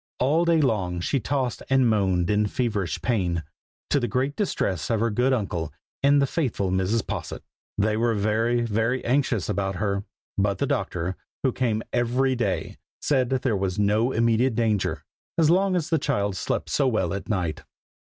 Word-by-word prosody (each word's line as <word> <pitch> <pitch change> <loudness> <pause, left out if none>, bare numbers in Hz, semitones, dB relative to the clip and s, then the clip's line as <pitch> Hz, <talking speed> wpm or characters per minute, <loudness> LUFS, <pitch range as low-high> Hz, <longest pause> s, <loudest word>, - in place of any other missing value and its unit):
All 155 +7 +3
day 170 -1 +4
long 95 - 0
she 135 +10 0
tossed 130 +1 -2
and 135 -2 +4
moaned 95 -5 +2
in 105 0 +2
feverish 105 -7 -2
pain, 90 -9 0 0.5
to 145 - +4
the 120 - -1
great 135 +4 -1
distress 100 - -1
of 115 -2 +1
her 115 +1 +1
good 125 +5 +2
uncle, 90 - -1 0.3
and 140 +1 +5
the 140 - +4
faithful 125 - -1
Mrs. 95 +4 +1
Posset. - - -5 0.3
They 105 +1 +2
were 115 +1 +1
very, 110 +4 +1
very 115 +3 0
anxious 125 - +1
about 95 0 -1
her; 100 +1 -1 0.4
but 100 -1 +1
the - - 0
doctor, 90 +2 -2 0.3
who 130 - +3
came 115 -4 -1
every 130 +2 +1
day, 120 0 -2 0.2
said 130 -4 +1
that 130 -1 -1
there 120 -5 +1
was 95 -1 -1
no 105 +4 +2
immediate 115 +1 +2
danger, 110 -4 0 0.3
as 160 -1 +4
long 190 +1 +3
as 170 -2 -1
the 160 - +3
child 100 -6 0
slept - - -2
so 140 - +2
well 95 -8 0
at 100 +3 -5
night. 90 -7 -1
115 Hz, 180 wpm, -25 LUFS, 100-130 Hz, 0.5 s, and